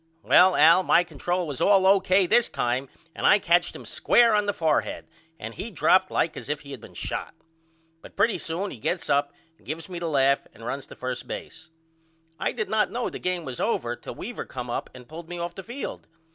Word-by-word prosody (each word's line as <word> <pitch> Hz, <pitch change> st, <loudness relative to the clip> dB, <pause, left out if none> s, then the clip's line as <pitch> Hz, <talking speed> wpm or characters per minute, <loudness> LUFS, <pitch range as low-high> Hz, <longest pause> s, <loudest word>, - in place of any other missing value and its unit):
Well 185 Hz, 0 st, +6 dB
Al 165 Hz, +5 st, +6 dB
my 175 Hz, -1 st, +4 dB
control 175 Hz, +1 st, -2 dB
was 145 Hz, -5 st, -5 dB
all 195 Hz, -2 st, +5 dB
O.K. 190 Hz, 0 st, +4 dB
this 235 Hz, +6 st, +3 dB
time 125 Hz, +3 st, -1 dB, 0.2 s
and -, -, 0 dB
I 200 Hz, -, +7 dB
catched 175 Hz, -2 st, +2 dB
him -, -, -10 dB
square 235 Hz, -2 st, +3 dB
on 210 Hz, -1 st, +2 dB
the -, -, +3 dB
fourhead 160 Hz, -6 st, -1 dB, 0.3 s
and 115 Hz, +1 st, -7 dB
he 225 Hz, -, -6 dB
dropped 185 Hz, -2 st, +3 dB
like 170 Hz, -, 0 dB
as -, -, -8 dB
if 150 Hz, 0 st, -2 dB
he 140 Hz, -, -12 dB
had 130 Hz, -5 st, -8 dB
been -, -, -14 dB
shot. -, -, -5 dB, 0.7 s
But -, -, -14 dB
pretty 210 Hz, +3 st, +2 dB
soon 180 Hz, +5 st, -3 dB
he -, -, -8 dB
gets 165 Hz, -, -2 dB
up 140 Hz, 0 st, +2 dB, 0.3 s
and -, -, -25 dB
gives 160 Hz, +4 st, -5 dB
me 175 Hz, -2 st, -5 dB
the 170 Hz, -, -3 dB
laugh 140 Hz, -2 st, +2 dB
and 115 Hz, -, -12 dB
runs 135 Hz, +3 st, -4 dB
to -, -, -12 dB
first 130 Hz, -1 st, -5 dB
base. 160 Hz, 0 st, -8 dB, 0.7 s
I -, -, 0 dB
did 215 Hz, -3 st, -3 dB
not 220 Hz, -1 st, +1 dB
know 245 Hz, 0 st, -3 dB
the -, -, -7 dB
game 180 Hz, -2 st, -2 dB
was 130 Hz, -3 st, -6 dB
over 120 Hz, 0 st, -1 dB
till -, -, -9 dB
Weaver 240 Hz, +3 st, -6 dB
come 125 Hz, -1 st, -6 dB
up -, -, -3 dB
and 125 Hz, -1 st, -12 dB
pulled 165 Hz, +1 st, -10 dB
me 175 Hz, -, -5 dB
off 170 Hz, 0 st, -4 dB
the 195 Hz, -, -8 dB
field. 240 Hz, +7 st, -7 dB
170 Hz, 225 wpm, -25 LUFS, 140-195 Hz, 0.7 s, I